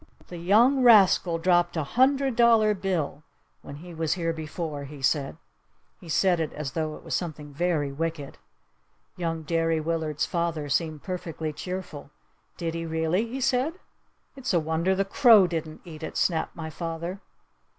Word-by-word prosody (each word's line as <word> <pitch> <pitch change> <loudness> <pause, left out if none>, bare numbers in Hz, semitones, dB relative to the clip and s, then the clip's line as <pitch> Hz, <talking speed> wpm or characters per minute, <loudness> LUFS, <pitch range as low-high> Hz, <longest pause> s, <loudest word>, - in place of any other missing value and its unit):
"The 175 - -7
young 230 +10 +4
rascal 195 -7 +5
dropped 175 0 +2
a 160 - 0
hundred 265 - +2
dollar 225 -3 +5
bill 180 -7 -2 0.4
when 140 - -9
he 175 +4 -11
was 160 -1 0
here 165 -2 -1
before!" 155 -2 -5
he 145 +1 -10
said. 140 +2 0 0.6
He 175 - -13
said 180 +2 +2
it 160 -2 -2
as 145 -3 -5
tho 155 -1 -3
it - - -13
was - - -5
something 150 -4 -4
very 155 -3 0
wicked. 155 - -4 0.8
Young 165 -2 -3
Derry 165 0 0
Willard's 155 -2 -1
father 165 -4 -2
seemed 155 0 -1
perfectly 165 -4 -4
cheerful. 180 -4 -6 0.5
"Did 165 -1 -3
he 165 0 -4
really?" 160 +7 0
he 255 +4 -5
said. 265 +4 +1 0.6
"It's 255 -8 -2
a - - +5
wonder 160 +4 0
the 195 +1 0
crow 220 -2 +6
didn't 160 -3 -4
eat 160 -2 -10
it!" 160 - -5
snapped 160 -3 0
my 160 -2 -6
father. 170 +4 -5
165 Hz, 160 wpm, -26 LUFS, 155-190 Hz, 0.8 s, crow